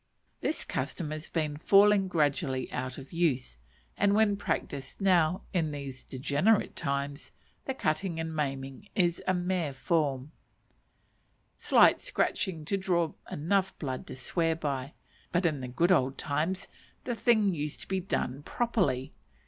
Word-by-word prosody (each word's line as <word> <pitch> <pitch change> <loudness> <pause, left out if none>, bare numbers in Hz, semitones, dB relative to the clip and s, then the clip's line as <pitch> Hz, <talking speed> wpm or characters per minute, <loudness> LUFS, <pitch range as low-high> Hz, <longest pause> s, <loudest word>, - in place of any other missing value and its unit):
This - - -1
custom 155 -5 -3
has 155 +1 -6
been 155 -3 -1
falling 200 +3 +5
gradually 145 -6 0
out 130 0 -4
of 135 +3 -10
use; 135 - 0 0.4
and 200 0 +3
when 215 -1 +4
practised 140 -8 -3
now, 180 -3 +3
in 165 -4 +1
these 140 -3 -6
degenerate 145 - +1
times, 140 +1 -3 0.3
the 265 - -2
cutting 165 -2 -1
and 160 0 -3
maiming 135 +3 -3
is 175 -3 +2
a 185 - +3
mere 175 -4 -1
form: 135 0 0 1.2
slight - - +5
scratching 190 - -1
to 200 - 0
draw 175 -4 +1 0.2
enough 190 +5 0
blood 130 -4 -4
to - - -7
swear 165 +5 0
by; 140 -3 -3 0.4
but, 175 +1 +1
in 150 -5 +1
"the 130 - -4
good 170 +9 +2
old 135 -6 +3
times," 160 +6 -1 0.4
the 245 - -2
thing 220 -3 +3
used 150 -2 -4
to - - -8
be 190 0 0
done 140 -7 -2
properly. 145 - 0
160 Hz, 145 wpm, -30 LUFS, 140-190 Hz, 1.2 s, falling